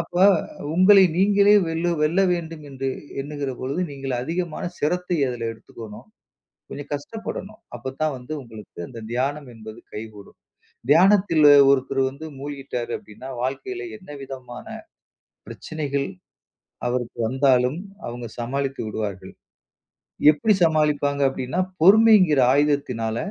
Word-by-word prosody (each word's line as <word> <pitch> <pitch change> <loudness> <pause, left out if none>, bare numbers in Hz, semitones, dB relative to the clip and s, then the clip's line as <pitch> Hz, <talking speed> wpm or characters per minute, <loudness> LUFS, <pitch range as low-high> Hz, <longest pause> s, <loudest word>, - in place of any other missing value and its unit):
அப்ப, 170 +1 -6 0.6
உங்களை, 190 +2 +7
நீங்களே 200 +2 +5
வெல்லு 165 +2 -1
வெல்ல 165 +6 +2
வேண்டுமென்று 150 -6 -5 0.3
என்னுகிற 145 -1 -4
பொழுது, 140 +7 -2
நீங்கள் 135 -2 -4
அதிகமான 170 +2 -3
சிரத்தை 180 +3 -1
அதுல 120 -2 -4
எடுத்துக்கணும். 110 -1 -12 0.6
கொஞ்சம் 145 +1 -8
கஷ்டப்படணும். 215 +6 -7 0.2
அப்பத்தான் 135 +5 -3
வந்து 125 +5 -9
உங்களுக்கு 110 -6 -13
அந்த 115 - -9
தியானம் 140 +2 -2
என்பது 110 0 -11
கைக்கூடும். 105 -2 -9 0.5
தியானத்தில 180 -2 +5 0.2
ஒருத்தர் 135 0 +1
வந்து 145 +4 -9
மூழ்கிட்டாரு 135 -4 -5
அப்டினா 115 +5 -12
வாழ்க்கையில 370 - -4
என்னவிதமான 135 -7 -9 0.8
பிரச்சினைகள் 140 -3 -4 0.8
அவருக்கு 120 -1 -3
வந்தாலும், 130 +2 +2 0.3
அவுங்க 120 0 -6
சமாளித்து 135 +3 -3
விடுவார்கள். 100 -3 -5 1.0
எப்புடி 215 +8 +2
சமாளிப்பாங்க 150 -3 +2
அப்டினா, 130 +6 -4 0.2
பொறுமைங்கிற 195 -5 +6
ஆயுதத்தினால, 130 -6 0
140 Hz, 105 wpm, -23 LUFS, 125-165 Hz, 1.0 s, உங்களை